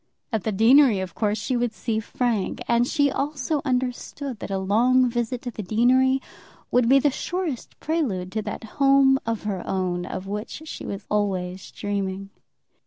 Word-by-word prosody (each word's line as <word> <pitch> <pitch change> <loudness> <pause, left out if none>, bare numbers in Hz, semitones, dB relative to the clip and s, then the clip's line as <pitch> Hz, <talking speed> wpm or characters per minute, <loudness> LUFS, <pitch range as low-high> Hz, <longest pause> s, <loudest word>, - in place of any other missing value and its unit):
At 220 - -1
the 220 - +1
deanery 230 +2 +5
of 185 -3 -5
course 210 -1 0
she 250 +4 -2
would 240 -1 0
see 220 0 -2
Frank; 225 -2 -1
and 235 +1 +3
she 285 -1 +2
also 290 +1 -1
understood 255 0 -2
that - - -6
a 195 - -1
long 240 +7 +3
visit 240 0 -2
to 245 - -4
the 215 - -6
deanery 255 +6 +3 0.5
would 245 -1 +3
be 270 - +7
the 280 +1 +3
surest 345 -3 -4
prelude 230 - -1
to 220 - -1
that 210 +1 -6 0.2
home 275 -1 +5
of 225 -2 -2
her 200 -4 -2
own 180 -1 -2
of 185 - -5
which 210 +9 -5
she - - -7
was 200 0 -5
always 190 -3 -1
dreaming. 195 -1 -4
230 Hz, 175 wpm, -24 LUFS, 200-260 Hz, 0.5 s, be